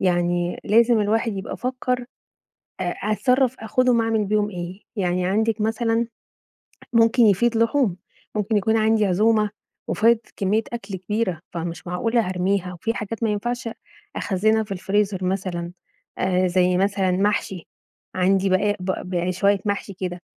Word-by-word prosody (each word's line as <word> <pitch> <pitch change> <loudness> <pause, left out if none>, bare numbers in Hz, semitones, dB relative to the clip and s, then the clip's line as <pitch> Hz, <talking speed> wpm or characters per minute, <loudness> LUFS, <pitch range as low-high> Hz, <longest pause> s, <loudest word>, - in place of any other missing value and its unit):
يعني 175 -1 0
لازم 230 +1 +4
الواحد 225 +2 +1
يبقى 195 - -5
فكّر 250 -1 -2 0.8
أ - - 0 0.3
أتصرف 255 +3 +2
آخدهم 240 +2 +2
أعمل 225 -2 +1
بيهم 210 +1 +1
إيه؟ 180 +1 -7
يعني 180 -3 0
عندِك 220 +3 +1
مثلًا 225 +1 0 0.9
ممكن 230 +2 +4
يفيض 225 +4 +3
لحوم، 230 -4 +2 0.4
ممكن 210 +1 0
يكون 220 +2 +2
عندي 220 -1 +3
عزومة، 210 +3 +2 0.4
وفايض 230 +2 +4 0.2
كمية 205 +3 +1
أكل 200 -5 -5
كبيرة، 185 -2 -2
فمش 170 0 -5
معقولة 225 +5 0
هارميها، 185 0 -1
وفي 200 +6 -3
حاجات 225 +1 -5
ما 220 - +2
ينفعش 240 +3 -2 0.5
أخزّنها 220 +3 +1
في 200 - -7
الفريزر، 195 0 0
مثلًا 180 -2 -2 0.5
آآ، 185 0 +2
زي 180 0 +2
مثلًا 195 0 +1
محشي، 195 -2 -1 0.5
عندي 190 +1 +2
بقايا 205 +2 +2
بق 185 +1 -2
بقايا 180 -1 -2
شوية 200 +2 +2
محشي 200 -1 -2
كده 180 -1 -5
205 Hz, 140 wpm, -23 LUFS, 185-225 Hz, 0.9 s, لازم